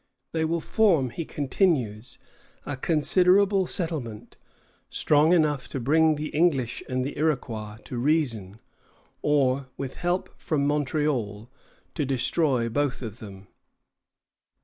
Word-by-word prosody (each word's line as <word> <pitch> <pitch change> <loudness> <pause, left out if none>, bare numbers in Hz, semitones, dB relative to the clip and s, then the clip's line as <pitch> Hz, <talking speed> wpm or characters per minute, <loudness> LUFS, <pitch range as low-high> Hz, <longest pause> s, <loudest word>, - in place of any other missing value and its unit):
They 160 -1 0
will 165 +1 0
form, 170 - +2
he 165 +5 -5
continues, 130 - -1 0.5
a 145 - -3
considerable 185 +6 +3
settlement, 150 - -4 0.5
"strong 150 +2 +3
enough 150 -6 +2
to 135 - -5
bring 155 +5 +3
the 150 +1 -4
English 145 -7 +1
and 130 0 -1
the 140 - -5
Iroquois 115 -9 -2
to 125 - -5
reason, 120 - 0 0.6
or, 140 -2 +2
with 135 -2 -5
help 175 +1 -1
from 145 -4 0
Montreal, 135 -7 -1 0.4
to 150 - -1
destroy 130 -1 +1
both 130 +2 -1
of 110 0 -7
them." 100 -2 -11
145 Hz, 120 wpm, -26 LUFS, 125-160 Hz, 0.6 s, considerable